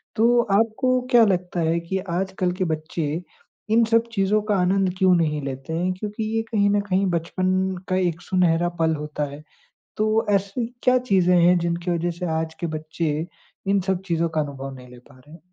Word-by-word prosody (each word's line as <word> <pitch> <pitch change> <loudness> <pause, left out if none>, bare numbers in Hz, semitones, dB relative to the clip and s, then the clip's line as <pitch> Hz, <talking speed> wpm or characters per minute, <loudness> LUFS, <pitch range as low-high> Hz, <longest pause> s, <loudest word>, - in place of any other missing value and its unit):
तो 240 +2 +4 0.2
आपको 255 +3 +1
क्या 240 -2 +7
लगता 180 -2 -1
है 165 +1 +1
कि 170 +3 -3
आजकल 185 +1 -1
के - - +2
बच्चे 155 +1 -3 0.5
इन 230 +1 +5
सब 230 +1 +2
चीज़ों 205 +1 +2
का 205 - +2
आनंद 190 0 +2
क्यों 185 -1 +4
नहीं 150 -3 0
लेते 135 +3 -5
हैं, 180 +3 0
क्योंकि 210 +3 -5
ये - - +2
कहीं 200 -2 +3
न 205 0 +2
कहीं 190 +1 +2
बचपन 175 +2 -1 0.4
का 185 - +1
एक 175 -2 0
सुनहरा 175 -2 +2
पल 160 -1 +2
होता 150 0 -4
है। 150 +1 -10 0.5
तो 215 +1 +2
ऐसी 200 +4 0 0.2
क्या 255 0 +5
चीज़ें 180 -2 +4
हैं 175 +1 +5
जिनकी 170 +1 -2
वज़ह 170 0 0
से 180 - -2
आज 160 0 -4
के 170 - -2
बच्चे 155 +1 -3 0.4
इन 200 0 +3
सब 190 -1 0
चीज़ों 170 -1 0
का 155 -1 0
अनुभव 135 -2 -6
नहीं 125 -1 -12
ले 125 - -13
पा 130 +2 -20
रहे 150 +4 -19
हैं? 170 - -13
180 Hz, 195 wpm, -23 LUFS, 160-200 Hz, 0.5 s, क्या